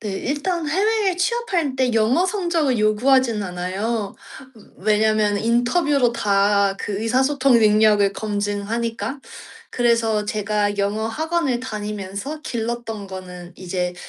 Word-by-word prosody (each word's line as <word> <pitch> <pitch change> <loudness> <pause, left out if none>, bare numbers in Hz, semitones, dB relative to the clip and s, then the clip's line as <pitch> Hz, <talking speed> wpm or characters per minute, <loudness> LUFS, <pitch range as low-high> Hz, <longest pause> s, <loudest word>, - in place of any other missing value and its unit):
네. 200 -3 -4
일단 310 +3 -2
해외에 400 +3 +1
취업할 370 - -1
때 260 -2 +1
영어 235 +11 +3
성적을 340 - 0
요구하지는 230 +2 +2
않아요. 195 +4 -3 0.6
왜냐면 215 0 +2
인터뷰로 245 - +2
다 200 -3 +2
그 205 0 -4
의사소통 260 +2 +3
능력을 210 -2 +4
검증하니까. 215 +6 -3 0.5
그래서 230 -3 +1
제가 210 0 -1
영어 205 +2 0
학원을 310 0 -1
다니면서 210 +3 -5
길렀던 225 -3 -4
거는 180 -2 -9
이제 180 -1 -3
225 Hz, 275 characters per minute, -21 LUFS, 205-270 Hz, 0.6 s, 능력을